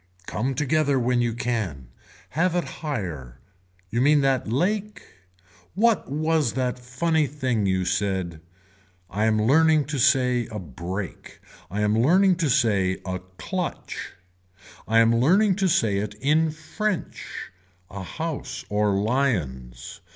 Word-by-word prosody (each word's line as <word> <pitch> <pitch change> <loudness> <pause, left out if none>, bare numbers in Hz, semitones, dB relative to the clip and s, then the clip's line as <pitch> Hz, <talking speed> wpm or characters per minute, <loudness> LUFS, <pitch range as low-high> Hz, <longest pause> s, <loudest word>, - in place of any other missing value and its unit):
Come 130 +4 -2
together 145 0 +2
when 125 0 +1
you 120 -1 0
can. 110 - -3 0.4
Have 175 +2 +1
it 175 - +1 0.2
higher. 85 - -4 0.5
You 120 - 0
mean 145 +2 +5
that 135 -5 +1
lake. 205 - -1 0.7
What 220 - +2
was 155 -3 +1
that 125 -1 -1
funny 150 +5 0
thing 130 -7 -1
you 95 -1 +1
said. 95 -4 -1 0.7
I 105 +2 0
am 110 -1 +2
learning 155 +6 +4
to 145 0 -3
say 125 -1 +3
a 110 - -6
break. 90 +3 -6 0.3
I 105 +3 -2
am 105 0 +2
learning 185 +6 +4
to 165 -5 0
say 100 -9 +2
a 95 -1 -3 0.2
clutch. 185 -2 -4 0.7
I 115 - +2
am 115 0 +5
learning 185 - +4
to 195 -2 +2
say 110 - +2
it 105 0 -3
in 155 +7 +2
french. 175 +6 -4 0.4
A 95 0 -6
house 160 - -5
or 105 -1 +1
lions. 100 - -2
125 Hz, 135 wpm, -24 LUFS, 105-155 Hz, 0.7 s, mean